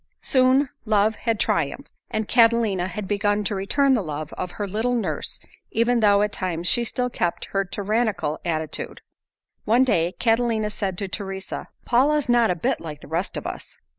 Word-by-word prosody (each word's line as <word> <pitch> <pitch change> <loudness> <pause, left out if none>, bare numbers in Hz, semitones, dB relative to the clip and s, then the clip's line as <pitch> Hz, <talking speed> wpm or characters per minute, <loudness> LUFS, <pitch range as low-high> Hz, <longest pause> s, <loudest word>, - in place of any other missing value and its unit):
Soon 260 +1 +3
love 215 -1 +3
had 225 -2 -1
triumphed, - - -1 0.2
and 215 -1 -2
Catalina 230 -6 +3
had 195 +1 -5
begun 205 +1 +1
to 205 - -1
return 265 +8 +2
the 240 - +2
love 155 -3 -5
of 180 -1 -5
her 205 - -3
little 220 +5 0
nurse 180 -11 -3 0.3
even 235 +2 +2
though 205 -2 +5
at 210 - 0
times 175 -3 -3
she 240 - +3
still 250 +2 -1
kept 175 -6 -1
her 195 0 +2
tyrannical 200 -5 -1
attitude. 160 -2 -3 0.6
One 235 +4 +4
day 175 -8 +1
Catalina 225 -2 +1
said 195 -3 -3
to 200 - -1
Teresa, 190 0 -5 0.2
"Paula's 285 +4 +3
not 240 -2 +4
a 180 - +1
bit 165 - -1
like 150 -3 -7
the - - -12
rest 170 +6 -2
of - - -6
us." - - -6
210 Hz, 175 wpm, -24 LUFS, 185-235 Hz, 0.6 s, though